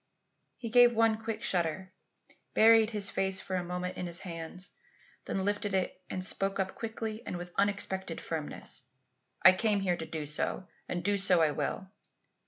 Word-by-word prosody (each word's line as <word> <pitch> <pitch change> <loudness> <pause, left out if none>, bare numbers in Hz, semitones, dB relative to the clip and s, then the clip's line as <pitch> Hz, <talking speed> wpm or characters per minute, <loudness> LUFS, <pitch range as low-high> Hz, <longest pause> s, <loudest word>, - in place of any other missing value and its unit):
He 230 -2 -6
gave 245 0 +6
one 225 -1 +3
quick 225 0 -4
shudder, 185 +1 -1 0.6
buried 225 0 +6
his 210 -3 +1
face 190 0 +1
for 190 - -4
one 180 -1 -2
moment 180 +1 -4
in 180 - -3
his 170 0 -1
hands, 170 +1 -7 0.5
then 190 -1 -2
lifted 205 -1 0
it 185 0 -2
and 185 0 -2
spoke 195 0 0
up 190 0 -1
quickly 225 -1 -5
and 180 - -5
with 175 0 -8
unexpected 190 -3 -1
firmness: 155 -3 -6 0.6
"I 190 - +11
came 205 +2 +1
here 180 -2 0
to 160 - -5
do 155 -2 -4
so 155 +5 -2 0.2
and 175 -1 -3
do 205 0 +1
so 185 -3 +4
I 155 - +3
will. 155 +6 -3
190 Hz, 175 wpm, -30 LUFS, 175-210 Hz, 0.6 s, I